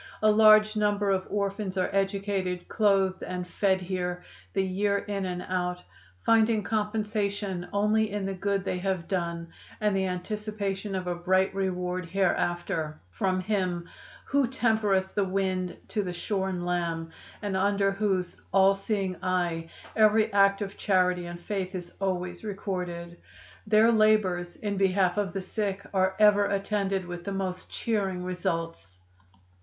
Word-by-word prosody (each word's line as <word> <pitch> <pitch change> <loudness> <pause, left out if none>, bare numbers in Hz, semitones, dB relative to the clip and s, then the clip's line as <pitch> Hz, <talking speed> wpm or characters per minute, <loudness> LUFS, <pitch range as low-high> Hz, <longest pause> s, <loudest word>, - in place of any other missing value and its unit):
A 215 - +6
large 215 0 +6
number 205 -1 +1
of 190 -1 0
orphans 200 -1 -2
are 185 - 0
educated, 195 -2 -1
clothed 195 -3 +2
and 180 -1 -4
fed 190 0 +1
here 180 -1 -3 0.3
the 195 - +2
year 200 +2 +1
in 200 -1 -3
and 180 0 -4
out, 180 -1 -2 0.4
finding 225 -1 +4
compensation 210 -3 -1
only 210 +2 +2
in 205 -1 -3
the 195 - -2
good 195 +1 -1
they 180 - -1
have 185 -2 -2
done 170 -3 -2 0.3
and 210 -2 +1
the 190 0 +1
anticipation 200 +1 -3
of 185 -1 -2
a 180 - -1
bright 185 +2 +1
reward 180 -2 -2
hereafter, 175 -4 0
from 185 - 0
Him 185 -4 -1 0.4
'Who 280 -2 +2
tempereth 220 -6 +1
the 205 - +2
wind 185 -1 -1
to 210 - 0
the 180 -3 -4
shorn 190 -1 -2
lamb,' 170 -2 -2 0.3
and 200 -2 -1
under 200 +1 +2
whose 195 -3 -1
'All 195 0 +6
seeing 195 -2 -2
Eye' 175 -3 -1 0.3
every 215 0 +4
act 200 0 +4
of 200 0 -7
charity 180 -3 +2
and 175 0 -7
faith 190 +1 -3
is 175 -1 -6
always 180 -1 -2
recorded. 180 -4 -4 0.5
Their 220 +2 +5
labors 210 -6 +3
in 205 -2 -3
behalf 190 -1 +2
of 200 -2 -1
the 195 - -2
sick 200 0 -3
are 190 0 +2
ever 210 -1 +6
attended 195 -1 -1
with 175 0 -7
the 200 - -4
most 185 -1 -3
cheering 195 -5 -1
results. 165 - -3
195 Hz, 150 wpm, -28 LUFS, 180-205 Hz, 0.5 s, A